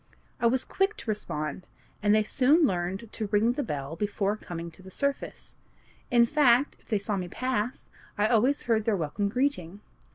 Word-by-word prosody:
I 235 - +3
was 255 +2 +1
quick 390 +2 0
to 220 - -3
respond, 155 -5 -4 0.3
and 205 0 +4
they 215 - +4
soon 280 +9 +4
learned 190 +1 -2
to 215 - -3
ring 210 +3 +3
the 290 - -2
bell 145 - -4
before 205 +2 -1
coming 170 -5 -7
to 165 - -17
the 190 - -12
surface; 280 +7 -3 0.6
in 235 -1 +5
fact, 275 0 +3
if - - -29
they 215 - +2
saw 200 0 -2
me 180 -1 -3
pass, 250 +3 -2 0.3
I 205 - +3
always 245 +5 +2
heard 220 -2 +1
their 220 -3 +2
welcome 175 +5 -1
greeting. 205 -7 -1
215 Hz, 185 wpm, -28 LUFS, 190-250 Hz, 0.6 s, in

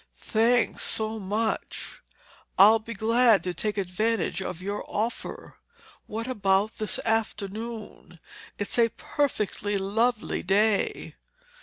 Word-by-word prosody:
"Thanks 230 +2 +1
so 220 0 -1
much. 215 +3 -3 0.6
I'll 215 +3 +7
be 230 +1 -8
glad 225 +1 +4
to 180 - -2
take 210 +4 -3
advantage 195 +1 -1
of 180 -3 -5
your 200 +3 -4
offer. 225 +3 -4 0.5
What 225 +2 -4
about 205 -3 +1
this 215 - +3
afternoon? 220 -3 -3 0.4
It's 205 +4 -2
a 230 -1 +5
perfectly 210 -7 -2
lovely 220 +4 0
day." 205 +3 +1
215 Hz, 110 wpm, -26 LUFS, 200-230 Hz, 0.6 s, I'll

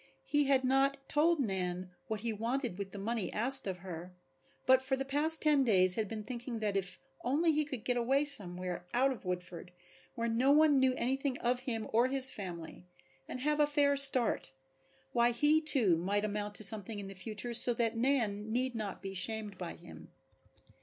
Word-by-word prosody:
He 290 -1 0
had 270 -1 +1
not 270 +2 +1
told 325 +2 +1
Nan 185 -5 -3 0.2
what 220 -2 -5
he 230 -1 -3
wanted 230 -1 -4
with 195 -1 -6
the - - -9
money 220 +1 -4
asked 255 +2 +7
of 185 -1 -4
her, 180 0 -9 0.5
but 260 0 +4
for 265 0 -2
the 270 +1 -5
past 300 +4 +5
ten 295 -3 +3
days 185 -6 +5
had 215 +2 -2
been 215 +1 -7
thinking 240 +1 -7
that 210 -2 -2
if 190 -2 -4 0.3
only 300 +7 +1
he 305 0 0
could 260 -6 -8
get 245 -1 -2
away 270 +5 0
somewhere 180 -10 +2
out 265 +2 +2
of 235 -8 -9
Woodford, 180 -1 -7 0.4
where 230 -1 -3
no 235 +4 0
one 300 -1 +4
knew 260 -1 +1
anything 265 +2 -2
of 245 +1 -2
him 235 -4 -4
or 235 +3 +3
his 265 0 +3
family, 175 -2 -9 0.4
and 250 - -8
have 300 +2 -1
a 295 - +3
fair 290 -1 +1
start, 270 - +3 0.6
why 235 0 +2
he 295 +6 +2
too 245 - +2
might 200 +5 -2
amount 205 0 -5
to - - 0
something 210 +1 +1
in 200 -1 -7
the 195 - -9
future 215 +5 -4
so 240 +1 +2
that 230 -1 -1
Nan 225 -4 -2
need 255 +2 -1
not 210 -4 -6
be 195 0 -7
shamed 210 +2 -2
by 175 -2 -7
him. 175 - -14
235 Hz, 195 wpm, -31 LUFS, 200-270 Hz, 0.6 s, asked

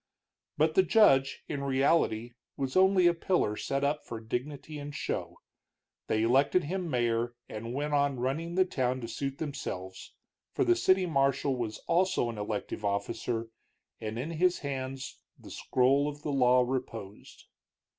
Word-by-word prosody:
But 155 +1 +3
the 190 - +6
judge, 165 - +4
in 145 -2 -3
reality, 130 -4 +1 0.2
was 135 -2 -3
only 190 -1 +5
a 175 - +6
pillar 170 - 0
set 135 +5 -2
up 145 +1 0
for 115 - -6
dignity 140 +6 -5
and 145 0 -7
show. - - -3 0.7
They 110 0 +1
elected 135 +9 +3
him 180 +2 -3
mayor, 120 -2 0
and 115 +3 -6
went 145 +1 -2
on 140 -3 +2
running 155 +7 -2
the 185 0 +4
town 130 -6 -1
to 115 - -5
suit 135 +4 -4
themselves, 95 - -6 0.4
for - - +1
the 355 -1 +4
city 190 - +3
marshal 140 -3 +1
was 115 -3 -3
also 170 -8 +2
an 110 - -8
elective 105 +1 -4
officer, 115 +3 -2 0.5
and 110 0 -5
in 140 +7 -3
his 180 +2 +2
hands 135 -1 -5 0.2
the - - -13
scroll 135 +3 +2
of 145 0 -10
the 150 - -2
law 125 -2 +4
reposed. 115 -5 -6
135 Hz, 155 wpm, -30 LUFS, 120-155 Hz, 0.7 s, the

